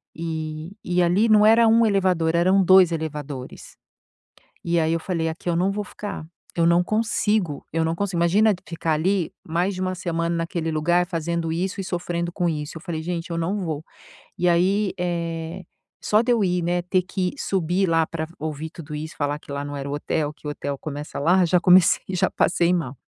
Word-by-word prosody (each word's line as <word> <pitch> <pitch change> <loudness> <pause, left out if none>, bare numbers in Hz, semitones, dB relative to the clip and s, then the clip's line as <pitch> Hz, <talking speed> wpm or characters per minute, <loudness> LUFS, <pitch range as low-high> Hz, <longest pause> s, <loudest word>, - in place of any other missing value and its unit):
e 160 +1 -5
e 180 0 +1
ali 190 +6 +3
não 210 -1 +6
era 225 +2 +6
1 230 +1 +5
elevador, 180 -5 +2
eram 185 +3 +4
2 185 -1 +6
elevadores. 150 -5 -6 0.9
E 170 0 +1
aí 160 0 +1
eu 165 - -1
falei: 165 -2 -2
“Aqui 165 +2 -6
eu 170 - 0
não 185 +3 +2
vou 205 0 -3
ficar! 205 -7 -7 0.3
Eu 170 - +3
não 170 +1 +4
consigo, 215 -6 0
eu 165 0 +1
não 165 - 0
consigo”. 195 0 -2
Imagina 205 +5 +4
ficar 165 0 -2
ali 180 +2 0
mais 175 +4 0
de 185 - -6
1 185 0 -1
semana 170 -1 -2
naquele 165 -1 -2
lugar, 175 +3 +2
fazendo 170 -1 -2
isso 185 +4 -2
e 195 - -4
sofrendo 175 -1 -3
com 175 0 0
isso. 150 -1 -4
Eu - - -17
falei: 165 -3 -4
“Gente, 170 +1 -4
eu 165 - -2
não 190 +5 -1
vou!”. 160 -3 -4 0.5
E 180 0 +2
aí, 190 +4 +2
eh, 170 0 -3 0.4
só 215 +1 +3
de 245 - 0
eu 225 -3 +2
ir, 180 -1 +1
né, 175 +1 0
ter 180 +1 +1
que 185 0 -2
subir 185 0 0
lá 165 -1 +3
para 160 -1 -4
ouvir 155 +1 -4
tudo 155 -2 -10
isso, 155 +1 -6
falar 145 0 -1
que - - -22
lá 140 0 -3
não 145 0 -6
era 140 0 -5
o - - -3
hotel. 150 +1 -2
Que 150 - -11
o - - -2
hotel 140 -1 -4
começa 145 +1 -6
lá, 180 +5 +4
já 175 +1 +3
comecei 180 -1 +5
já 185 -2 +1
passei 175 0 +2
mal. 145 -7 -2
170 Hz, 205 wpm, -23 LUFS, 160-185 Hz, 0.9 s, não